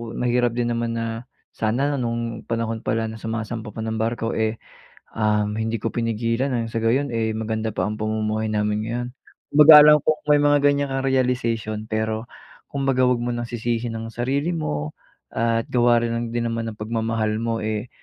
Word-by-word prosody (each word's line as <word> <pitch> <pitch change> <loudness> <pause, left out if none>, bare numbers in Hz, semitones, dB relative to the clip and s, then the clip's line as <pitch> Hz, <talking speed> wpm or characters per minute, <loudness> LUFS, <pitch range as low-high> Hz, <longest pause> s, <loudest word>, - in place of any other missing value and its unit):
mahirap 120 -1 +1
din 120 -1 0
naman 115 0 -1
na, 115 +1 -4 0.2
"Sana 135 +6 0
nung 115 -1 -3
panahon 115 -1 -2
pala 110 -1 -1
na 110 - -9
sumasampa 110 0 -5
pa 110 - -4
ng 110 0 -3
barko, 115 0 -1
eh, 110 0 0 0.6
um, 105 -1 +1
hindi 110 +1 -1
ko 115 - -2
pinigilan 115 +2 -1
ang 115 -2 -2
sa 115 - -1
gayon, 130 +4 +1
eh, 110 -1 -1
maganda 110 0 -2
pa - - 0
ang 105 0 -4
pamumuhay 110 0 -1
namin 105 0 0
ngayon." 120 +1 -3 0.4
Kumbaga 150 +2 +9
alam 150 0 +8
kong 155 -1 +1
may 145 - +6
mga 145 0 +4
ganyan 145 0 +3
kang 135 0 -1
realization 115 -4 0
pero 110 0 -1 0.5
kumbaga 135 -2 +1
'wag 125 -1 +2
mo 120 - -1
nang 120 - -3
sisihin 120 0 -2
ang 115 - -6
sarili 140 +8 -1
mo 75 - -3 0.4
at 115 0 0
gawa 120 -1 +3
rin 115 - -1
lang 120 0 -2
din 120 0 0
naman 115 0 -3
ng 105 - -13
pagmamahal 110 0 -1
mo, 115 -1 -1
eh, 110 +2 -3
115 Hz, 185 wpm, -23 LUFS, 110-120 Hz, 0.6 s, Kumbaga